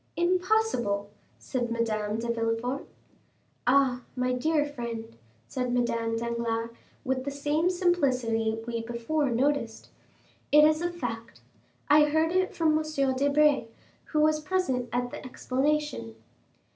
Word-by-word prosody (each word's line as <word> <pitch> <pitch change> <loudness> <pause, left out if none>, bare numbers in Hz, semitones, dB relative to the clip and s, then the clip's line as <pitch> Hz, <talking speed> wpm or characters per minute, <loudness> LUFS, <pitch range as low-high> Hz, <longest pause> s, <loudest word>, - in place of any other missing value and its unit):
"Impossible," 350 - +1 0.3
said 245 -3 -3
Madame 215 -2 -1
de 230 +1 -3
Villefort. 230 +4 -2 0.8
"Ah, 255 -1 +3
my 250 0 0
dear 295 +4 +1
friend," 235 - -6 0.3
said 250 - -2
Madame 230 -2 0
Danglars, 230 0 -2 0.3
with 260 0 -1
the 280 - -3
same 290 +4 0
simplicity 255 -12 +1
we 230 -1 -3
before 240 +6 -1
noticed, 245 -2 -1 0.6
"it 300 +1 +8
is 310 +1 +4
a 345 - 0
fact. 230 -9 -6 0.5
I 300 +1 +6
heard 315 +2 +1
it 370 +1 0
from 310 -2 +3
M. 275 -4 0
Debray, 285 0 +3 0.4
who 305 - 0
was 305 0 +3
present 300 -7 -1
at 245 0 -1
the - - -8
explanation." 265 - -1
260 Hz, 125 wpm, -28 LUFS, 230-305 Hz, 0.8 s, it